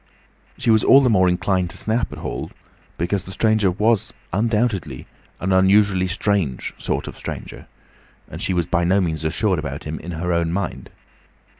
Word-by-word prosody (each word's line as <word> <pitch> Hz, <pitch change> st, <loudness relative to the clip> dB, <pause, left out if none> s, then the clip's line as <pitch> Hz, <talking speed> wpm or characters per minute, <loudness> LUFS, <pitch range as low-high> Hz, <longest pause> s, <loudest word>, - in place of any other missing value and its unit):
She 115 Hz, -, +2 dB
was 110 Hz, -1 st, +4 dB
all 135 Hz, -, +7 dB
the 125 Hz, -3 st, +3 dB
more 95 Hz, -3 st, +4 dB
inclined 90 Hz, 0 st, 0 dB
to -, -, -7 dB
snap 115 Hz, +2 st, -1 dB
at -, -, -8 dB
Hall -, -, -5 dB, 0.5 s
because 90 Hz, +3 st, -1 dB
the 95 Hz, -, -8 dB
stranger 110 Hz, -1 st, +2 dB
was 105 Hz, +4 st, +1 dB, 0.2 s
undoubtedly 105 Hz, -, 0 dB, 0.3 s
an 95 Hz, -, -1 dB
unusually 95 Hz, 0 st, +4 dB
strange 95 Hz, -, -1 dB
sort -, -, -2 dB
of -, -, -7 dB
stranger, -, -, -8 dB, 0.6 s
and -, -, -8 dB
she 95 Hz, -, 0 dB
was 85 Hz, -1 st, +1 dB
by 85 Hz, 0 st, 0 dB
no 95 Hz, +3 st, +3 dB
means 80 Hz, -4 st, -1 dB
assured 90 Hz, +3 st, 0 dB
about 70 Hz, -2 st, -5 dB
him 80 Hz, +1 st, -5 dB
in 90 Hz, +1 st, -7 dB
her 85 Hz, +2 st, -2 dB
own 85 Hz, -1 st, 0 dB
mind. 100 Hz, +3 st, -4 dB
95 Hz, 175 wpm, -21 LUFS, 85-105 Hz, 0.6 s, all